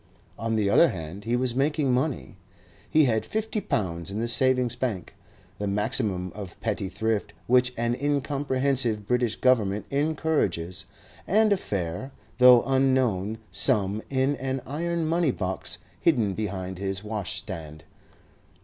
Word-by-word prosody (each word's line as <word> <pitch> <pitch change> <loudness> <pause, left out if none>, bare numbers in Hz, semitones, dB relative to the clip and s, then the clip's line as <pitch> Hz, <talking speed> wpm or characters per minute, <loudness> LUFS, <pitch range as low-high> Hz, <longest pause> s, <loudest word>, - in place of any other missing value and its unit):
On 115 0 -1
the 105 -2 +1
other 165 +11 +5
hand 85 +4 -7
he 120 +2 +1
was 125 -1 0
making 140 0 +1
money. 130 - -2 0.5
He 155 - +5
had 110 -5 +2
fifty 220 - -2
pounds 85 - -2
in 100 +2 -4
the 115 - -1
Savings 125 0 +2
Bank, 120 -8 -3 0.5
the 105 - -2
maximum 105 -3 0
of 100 -4 -9
petty 105 -3 -2
thrift 110 +2 -2
which 125 0 +4
an 120 +1 0
incomprehensive 135 -4 +1
British 120 0 +1
Government 105 -6 +2
encourages, 140 - 0 0.4
and 215 +1 +4
a - - +1
fair, 95 - -4 0.3
though 125 -1 +8
unknown, 130 -7 +1
sum 100 +1 +2
in 135 +1 +1
an 130 0 -3
iron 170 +3 -2
money 165 0 +2
box 95 -6 -2 0.2
hidden 115 - +2
behind 95 -3 -4
his 95 0 -3
washstand. 80 -7 -5
120 Hz, 135 wpm, -26 LUFS, 100-135 Hz, 0.5 s, though